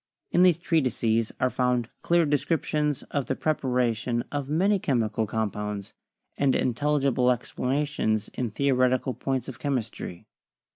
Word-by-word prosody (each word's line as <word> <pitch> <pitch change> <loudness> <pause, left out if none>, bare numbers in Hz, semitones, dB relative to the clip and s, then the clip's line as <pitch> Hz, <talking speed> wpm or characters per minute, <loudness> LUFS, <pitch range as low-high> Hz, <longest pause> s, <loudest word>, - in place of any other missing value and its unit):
In 175 - +4
these 180 -3 +6
treatises 120 -9 +1
are 130 0 +2
found 125 -2 0
clear 170 -1 +3
descriptions 150 0 0
of 140 -3 -1
the 135 - 0
prep 155 +2 -1
aration 120 -2 0
of 145 -1 -3
many 190 +6 +2
chemical 115 -7 0
compounds, 105 -2 -3 0.5
and 140 -2 +3
intelligible 135 0 +1
ex 125 -1 -1
planations 130 -5 0
in 125 -2 -2
theoretical 130 +1 +1
points 130 -2 -2
of 130 -3 -8
chemistry. 115 - -3
130 Hz, 135 wpm, -26 LUFS, 115-145 Hz, 0.5 s, these